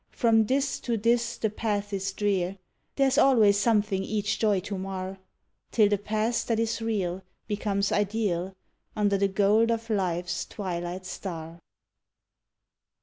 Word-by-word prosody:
From 225 -3 +3
this 275 +2 0
to 235 -2 -1
this 235 +2 +1
the 220 - -1
path 205 -2 -2
is 195 0 -1
drear; 195 -2 -1 0.4
there's 270 -2 +3
always 215 -7 +5
something 210 -3 +2
each 210 0 -1
joy 210 -3 +3
to 200 +2 -5
mar, 190 0 -5 0.5
Till 215 -3 +4
the 205 -1 +1
past 215 +3 -1
that 230 -2 +1
is 230 0 -1
real 195 -5 -1 0.3
becomes 205 -1 -1
ideal 195 -3 0 0.4
under 205 -2 +2
the 200 - +3
gold 205 +4 +3
of 230 0 -2
life's 180 -3 -1
twilight 180 -2 -4
star. 165 -3 -6
205 Hz, 140 wpm, -27 LUFS, 190-225 Hz, 0.5 s, always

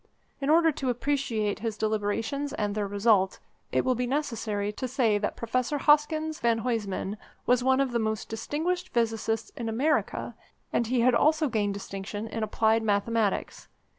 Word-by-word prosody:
In 275 0 -2
order 325 +1 +5
to 270 -3 -3
appreciate 245 -5 -1
his 220 -1 -3
deliberations 220 +6 -1
and 205 -1 -1
their 210 -1 -1
result, 200 -1 +2 0.3
it - - +1
will 255 - +3
be 250 0 -1
necessary 230 -7 -1
to 255 +5 -4
say 235 -5 +2
that 205 - -2
Professor 255 +5 -1
Hoskins 310 +2 +2
van 235 -1 +2
Huysman 210 -4 -2 0.3
was 250 0 +3
one 260 +1 +3
of 275 -2 +1
the 235 - 0
most 220 -1 -2
distinguished 315 +11 -2
physicists 225 -1 -1
in 230 -2 -3
America, 280 +8 0 0.4
and 235 - +1
he 245 0 +1
had 250 +1 +4
also 310 +4 +3
gained 205 -3 0
distinction 200 +1 -5
in 225 - -4
applied 220 +1 +2
mathematics. 215 0 0
230 Hz, 165 wpm, -28 LUFS, 215-270 Hz, 0.4 s, order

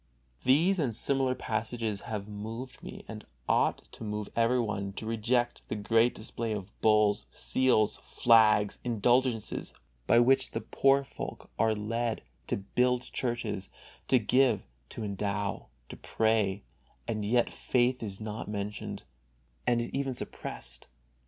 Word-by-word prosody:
These 165 +9 +4
and 120 -8 0
similar 135 0 +1
passages 110 -2 -2
have 105 -2 -3
moved 110 +5 -7
me - - -9
and - - -7 0.2
ought - - +2
to - - -9
move 105 -1 -3
everyone 115 -4 +1
to 110 - -6
reject 120 +2 0
the - - -3
great 115 +3 +3
display 115 +1 -3
of 105 0 -6
bulls, 105 -1 +3
seals, 125 -5 +2
flags, 105 -3 +4
indulgences, 120 0 +1 0.3
by - - +5
which 135 +3 +4
the - - -3
poor 135 0 +3
folk - - -8
are 110 0 +3
led 115 - -2 0.2
to - - 0
build 125 +5 +1
churches, 120 -6 -2 0.4
to 130 - +5
give, 120 -2 +3 0.3
to 115 - -6
endow, 100 0 -2 0.2
to - - -8
pray, 110 -3 +1 0.4
and 110 -2 -2
yet 120 +3 +2
faith 125 0 +1
is 100 -4 -5
not 110 0 -5
mentioned, 105 0 -4 0.6
and 120 -1 +4
is 120 - -2
even 135 -1 -1
suppressed. - - -7
115 Hz, 135 wpm, -30 LUFS, 105-125 Hz, 0.6 s, by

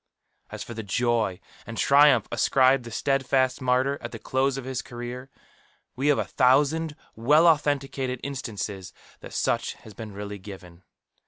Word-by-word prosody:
As - - -6
for 120 - -8
the 115 - -5
joy 110 -2 0 0.3
and 115 0 -7
triumph 140 -4 +5
ascribed 130 -1 +3
to - - -7
the - - -7
steadfast 135 -1 +1
martyr 130 +2 +1
at 120 - -6
the 115 - -6
close 130 +3 0
of 135 - -6
his 130 -1 -3
career, 120 +2 -8 0.7
we 135 +3 -1
have 145 - +4
a - - -1
thousand 145 +5 +2 0.2
well 150 +9 +4
authenticated 140 -5 +1
instances 105 -8 -5 0.3
that - - -11
such - - -1
has 110 - -15
been 110 +1 -8
really 100 0 -7
given. 90 -3 -11
130 Hz, 160 wpm, -26 LUFS, 115-135 Hz, 0.7 s, triumph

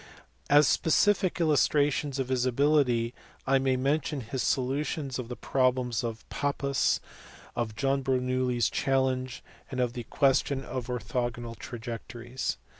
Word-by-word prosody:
As 145 0 +6
specific 185 +3 +2
illustrations 145 -3 +2
of 130 -2 -2
his 130 -1 +1
ability 125 -3 +2 0.3
I 135 0 +3
may 130 -1 +1
mention 145 +2 0
his 125 +3 -4
so 130 - +2
lutions 140 0 -2
of 125 - -5
the 125 - -4
problem 130 -1 +1
of 115 -2 -5
Pappus, 140 -1 0 0.6
of 115 -3 -2
John 135 +2 +1
Bernoulli 130 -1 0
s 120 - +3
challenge, 130 -2 0 0.3
and 130 - -4
of 125 -1 +1
the 120 -2 -6
question 135 -1 +2
of 125 -2 -4
orthogonal 120 -1 -3
trajectories. 120 - -5
130 Hz, 135 wpm, -28 LUFS, 120-140 Hz, 0.6 s, As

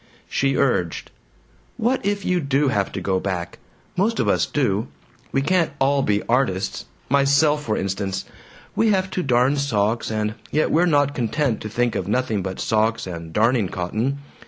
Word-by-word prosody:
She 135 -1 0
urged, 90 -11 0 0.7
"What 250 +4 0
if 200 0 -1
you 180 -1 +2
do 140 -1 +1
have 100 -5 0
to - - -3
go 95 -1 0
back? 90 -3 -4 0.4
Most 210 +5 +1
of - - +1
us - - +2
do! 115 -5 0 0.4
We 135 - +1
can't 175 0 +2
all 140 0 +2
be 105 -4 +1
artists 115 -6 0 0.2
myself, 140 +2 +3
for 110 -5 -1
instance. 95 0 -2 0.5
We 225 - +3
have 190 -2 +1
to 185 - -1
darn 130 0 +2
socks, 115 -5 0
and 110 -1 -1 0.2
yet 155 - +1
we're 170 +3 +4
not 145 -3 +3
content 125 0 -1
to 110 - -5
think 120 +1 0
of 95 - -3
nothing 110 -2 0
but 95 0 -5
socks 110 +1 +1
and 85 -3 -7
darning 110 +1 +2
cotton. 110 +10 -2
125 Hz, 170 wpm, -22 LUFS, 105-145 Hz, 0.7 s, we're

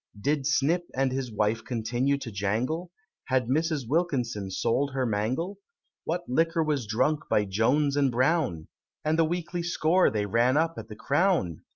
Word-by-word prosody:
Did 140 +4 0
Snip 160 +5 +1
and 135 0 +1
his 130 -2 -3
wife 105 +1 0
continue 120 +4 0
to 135 -4 -7
jangle? 115 - -2 0.4
Had 130 -2 +1
Mrs. 155 -2 0
Wilkinson 125 - -1
sold 130 +8 0
her 130 -1 0
mangle? 120 - -2 0.5
What 175 +2 -2
liquor 165 +5 +1
was 145 -7 -1
drunk 145 +8 0
by 105 - +2
Jones 130 +9 +1
and 140 -2 +2
Brown? 130 - +1 0.4
And 155 +1 +1
the 165 - +5
weekly 175 +1 -3
score 175 +1 +2
they 105 -2 -1
ran 120 +6 +2
up 165 +1 +2
at - - -9
the 110 - -9
Crown? 140 - +1
135 Hz, 165 wpm, -27 LUFS, 115-160 Hz, 0.5 s, the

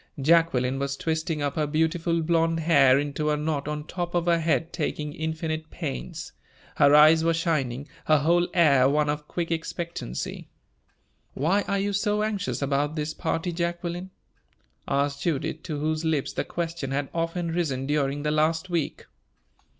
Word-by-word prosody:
Jacqueline 135 -4 +3
was 140 0 -2
twisting 160 -1 -2
up 140 -1 -1
her 155 -2 0
beautiful 165 +2 0
blonde 165 0 +1
hair 140 -5 +5
into 145 +1 -1
a 150 - +1
knot 150 -2 -2
on 150 0 -3
top 175 +1 -4
of 170 -1 +1
her 170 -1 +3
head, 165 +1 0
taking 150 -2 -3
infinite 160 0 -3
pains; 155 -6 -5 0.5
her 140 - +6
eyes 155 +2 +7
were 165 0 +2
shining, 140 -5 -1 0.2
her 155 - +5
whole 170 +4 +3
air 140 -6 +5
one 150 +1 +2
of 150 0 -5
quick 170 -1 -3
expectancy. 165 - -4 0.9
"Why 170 +9 +2
are 200 - 0
you 200 +1 -1
so 210 +1 +1
anxious 200 -7 -2
about 145 +2 0
this 155 0 -2
party, 165 +1 -2
Jacqueline?" 175 +1 -3 0.8
asked 140 0 0
Judith, 160 -1 -1
to 155 -4 -3
whose 155 +1 -1
lips 155 -4 0
the - - -2
question 165 -5 -4
had 140 +1 -1
often 165 0 -2
risen 145 -6 -1
during 145 0 0
the 150 - 0
last 160 +4 +1
week. 165 -4 -2
160 Hz, 160 wpm, -26 LUFS, 145-170 Hz, 0.9 s, eyes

